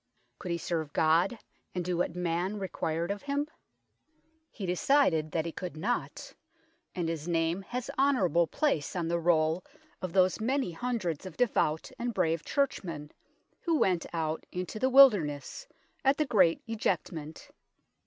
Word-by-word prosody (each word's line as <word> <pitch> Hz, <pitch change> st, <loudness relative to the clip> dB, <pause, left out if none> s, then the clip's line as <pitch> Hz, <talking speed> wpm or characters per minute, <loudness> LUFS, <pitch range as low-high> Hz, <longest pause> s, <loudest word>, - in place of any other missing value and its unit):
Could 180 Hz, -, -6 dB
he 170 Hz, -, 0 dB
serve 160 Hz, -3 st, -3 dB
God 165 Hz, +8 st, +3 dB, 0.4 s
and 180 Hz, -1 st, -2 dB
do 180 Hz, 0 st, 0 dB
what 175 Hz, -1 st, -1 dB
man 180 Hz, +3 st, -1 dB
required 170 Hz, -3 st, -2 dB
of 205 Hz, -, -4 dB
him? 285 Hz, +1 st, -1 dB, 1.0 s
He 200 Hz, -, -6 dB
decided 180 Hz, -, +2 dB
that 160 Hz, -1 st, -1 dB
he 165 Hz, -, -3 dB
could 175 Hz, -2 st, -6 dB
not, 230 Hz, +9 st, -3 dB, 0.6 s
and 175 Hz, -2 st, -1 dB
his 165 Hz, -1 st, -3 dB
name 165 Hz, +2 st, +1 dB
has 245 Hz, +5 st, -5 dB
honourable 190 Hz, -12 st, +3 dB
place 190 Hz, -, 0 dB
on 170 Hz, -2 st, -1 dB
the 170 Hz, 0 st, +1 dB
roll 165 Hz, 0 st, +2 dB, 0.4 s
of 185 Hz, -, -3 dB
those 185 Hz, +1 st, +3 dB
many 260 Hz, -3 st, 0 dB
hundreds 190 Hz, -5 st, -3 dB
of 185 Hz, -, -11 dB
devout 160 Hz, -10 st, +1 dB
and 240 Hz, -2 st, -2 dB
brave 165 Hz, -3 st, +1 dB
Churchmen 170 Hz, -, -2 dB, 0.5 s
who 335 Hz, -2 st, +1 dB
went 180 Hz, -, +1 dB
out 160 Hz, -1 st, -2 dB
into 180 Hz, +4 st, -4 dB
the 260 Hz, -, +2 dB
wilderness 215 Hz, -, +4 dB, 0.4 s
at 270 Hz, +1 st, +4 dB
the 305 Hz, -, +2 dB
Great 185 Hz, -, +3 dB
Ejectment. 170 Hz, -8 st, -3 dB
180 Hz, 150 wpm, -30 LUFS, 165-230 Hz, 1.0 s, wilderness